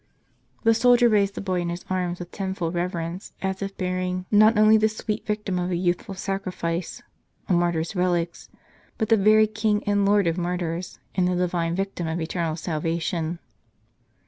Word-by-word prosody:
The 225 -1 +5
soldier 245 +1 +5
raised 200 -3 +2
the - - -4
boy 185 -3 -1
in 170 - -2
his 175 +1 -5
arms 180 -1 -1
with 175 0 -8
tenfold 190 -4 -3
rever 175 0 -1
ence, 170 +3 -6
as 190 0 -3
if 195 0 -5
bearing, 185 0 -2
not 215 +1 +6
only 215 +1 +6
the 220 0 +4
sweet 215 0 -4
victim 210 -3 -1
of 180 0 -1
a 180 - 0
youthful 180 +2 -1
sacrifice, 185 -3 -3 0.4
a 190 - +1
martyr's 175 0 0
relics, 175 -2 -1 0.5
but 220 - -1
the 225 - +6
very 215 +1 +5
King 215 -1 0
and 205 -1 +1
Lord 200 0 +3
of 165 +1 0
Martyrs, 175 0 -3 0.2
and 185 -1 +2
the 180 - +1
divine 175 -2 0
Victim 195 -3 -3
of 160 +2 -2
eternal 165 -1 -2
salvation. 165 +1 -2
185 Hz, 175 wpm, -24 LUFS, 175-205 Hz, 0.5 s, not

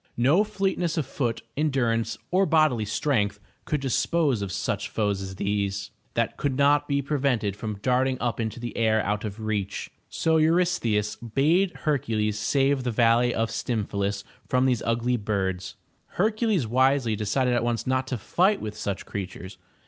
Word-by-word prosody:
No 140 - +4
fleetness 195 -5 -1
of 155 - 0
foot, 120 -3 -2
endur 135 -6 +1
ance, 115 -1 -2
or 190 +1 +3
bodily 155 -9 +3
strength 105 -4 0 0.3
could 150 -2 -1
dispose 135 -1 +1
of 100 -2 -3
such - - -2
foes 105 -3 -1
as 95 0 -6
these, 100 0 -2 0.2
that - - 0
could 140 -3 -1
not 145 +1 +4
be 140 -1 0
prevented 130 -8 0
from 105 0 -5
darting 130 +1 +2
up 120 -1 -1
into 110 +1 -3
the 120 0 -6
air 110 -1 +2
out 105 +1 -1
of 105 +1 -6
reach. 105 -3 -3 0.2
So 160 0 +1
Eurystheus 155 - +2
bade 155 - +1
Hercules 110 -8 0
save 135 +4 +2
the 125 - -1
valley 120 +1 +3
of 115 -1 -1
Stymphalus 100 -4 -2 0.2
from 130 0 +2
these 125 -4 +2
ugly 120 +2 +1
birds. 95 -3 -2 0.4
Hercules 215 - +1
wisely 130 0 +2
decided 115 +5 0
at 120 -1 +1
once 115 -1 -1
not 130 0 0
to 130 - -2
fight 185 - +2
with 105 -1 -5
such 100 -2 -4
creatures. 95 -1 -7
120 Hz, 165 wpm, -26 LUFS, 105-140 Hz, 0.4 s, No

